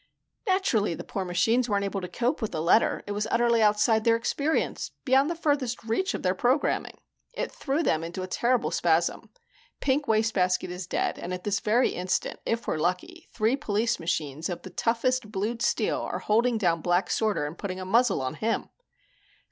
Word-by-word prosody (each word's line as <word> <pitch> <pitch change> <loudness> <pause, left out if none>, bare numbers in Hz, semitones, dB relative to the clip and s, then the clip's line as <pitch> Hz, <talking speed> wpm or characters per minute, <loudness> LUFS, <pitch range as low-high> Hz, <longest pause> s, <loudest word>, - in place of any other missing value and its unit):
"Naturally 255 - +1
the - - -7
poor 195 - -4
machines 225 +8 +1
weren't 200 -1 +1
able 195 0 -3
to 180 - -4
cope 240 +9 -1
with 220 - -2
the - - -3
letter. 195 +7 +3
It 205 - -5
was 210 +1 -1
utterly 235 -1 +3
outside 215 +1 +3
their 230 0 +4
experience, 285 +6 -1 0.2
beyond 270 +2 +4
the 340 - -2
furthest 285 -8 -1
reach 305 +13 -1
of - - -6
their 185 - +2
programming. 250 +8 0 0.4
It - - -3
threw 295 +3 -1
them 160 - +1
into 175 +3 -5
a - - -4
terrible 240 +5 +1
spasm. 170 0 +1 0.5
Pink 280 +1 0
Wastebasket 215 -5 +1
is 180 0 -6
dead - - -1
and 180 - -4
at 180 - -9
this 205 -1 0
very 235 +4 +2
instant, 180 +1 -2
if 230 +1 -1
we're - - 0
lucky, 185 - -3
three 225 +3 +1
police 225 -3 0
machines 160 -1 -2
of 175 - -5
the - - -9
toughest 235 0 0
blued 220 +3 -2
steel - - +1
are - - -3
holding 230 +2 +2
down 170 -6 +1
Black 175 +3 +1
Sorter 215 -8 +1
and 150 +3 -5
putting 185 -1 -5
a 185 - -5
muzzle 220 - +2
on 130 - -2
him." 220 +8 -2
215 Hz, 190 wpm, -27 LUFS, 185-245 Hz, 0.5 s, their